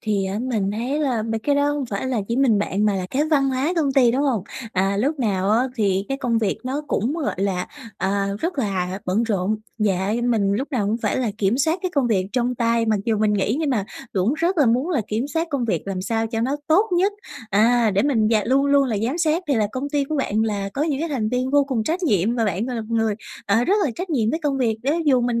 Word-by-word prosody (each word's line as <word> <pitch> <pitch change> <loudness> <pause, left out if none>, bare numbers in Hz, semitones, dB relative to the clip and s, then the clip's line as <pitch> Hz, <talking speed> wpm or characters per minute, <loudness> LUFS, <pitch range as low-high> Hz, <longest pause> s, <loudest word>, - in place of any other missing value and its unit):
thì, 205 -3 0
á, 195 +2 -3
mình 215 -6 -1
thấy 250 +7 -2
là 250 -7 0
mấy 225 0 -2
cái 285 +6 0
đó 285 0 +2
hông 285 -3 -2
phải 205 +4 -3
là 250 -5 0
chỉ 235 - -1
mình 245 -6 +3
bạn 205 +1 0
mà 210 - +2
là 185 -1 -2
cái 290 +3 +1
văn 275 -3 +3
hóa 265 +6 0
công 290 -5 +1
ty, 255 -4 +5
đúng 265 +4 0
hông? 245 -9 +1 0.3
À, 195 +1 +1
lúc 280 +8 0
nào 200 -5 0
á 245 +5 +2
thì 195 -3 +1
cái 270 0 -2
công 235 -3 0
việc 215 -4 -1
nó 275 +4 -2
cũng, 240 +4 0
gọi 325 -4 -2
là, 190 -2 -1 0.3
à, 195 +1 0
rất 335 -3 -2
là 190 -4 -1
bận 190 +5 +1
rộn. 210 -1 0 0.2
Dạ 195 -1 +1
như 240 +1 -1
mình 215 -5 +1
lúc 260 +8 -2
nào 210 -6 0
cũng 220 +2 0
phải - - 0
là 245 -5 0
kiểm 210 +5 +1
soát 320 +5 +1
cái 370 - -1
công 275 -4 +2
việc 190 -5 +1
trong 250 0 0
tay, 230 -1 +1
mặc 215 -2 +2
dù 220 -2 +1
mình 215 -1 +2
nghỉ 205 +5 0
nhưng 300 -3 0
mà 210 -6 0 0.3
cũng 200 +8 +1
rất 340 +2 0
là 280 - +5
muốn 255 +9 +1
là 295 - +1
kiểm 230 +6 -2
soát 330 +2 -1
công 275 -5 -1
việc 225 - -1
làm 190 -2 -3
sao 225 +2 -1
cho 225 0 -3
nó 265 +5 0
tốt 385 +7 +3
nhất, 395 +3 +2 0.4
à, 225 +2 +4
để 195 +1 +1
mình 230 -7 +2
d 225 - +2
luôn 275 +3 +3
luôn 280 -1 +4
là 225 -5 -1
giám 295 +8 -2
sát, 325 +1 +1
thì 280 - +3
là 215 -2 +2
công 275 +2 -4
ty 285 -1 +1
của 305 +2 -3
bạn 220 -5 0
là 200 -3 -1
có 280 - 0
những 300 -3 -1
cái 330 - -1
thành 235 -7 -1
viên 250 +2 -1
vô 285 0 +4
cùng 245 -6 -2
trách 350 +4 -1
nhiệm 215 - +2
và 230 - +1
bạn, 205 +3 -1
gọi 250 - -3
là, 225 - -3
một 225 +1 -5
người, 220 -2 +1 0.3
ờ, 225 +4 +3
rất 395 - +3
là 275 - 0
trách 360 +4 -5
nhiệm 230 -6 +1
với 320 - -1
công 280 -2 0
việc 225 -4 +1
đấy. 305 +6 0
Dù 260 -4 +4
mình 240 -1 0
235 Hz, 280 wpm, -22 LUFS, 210-280 Hz, 0.4 s, ty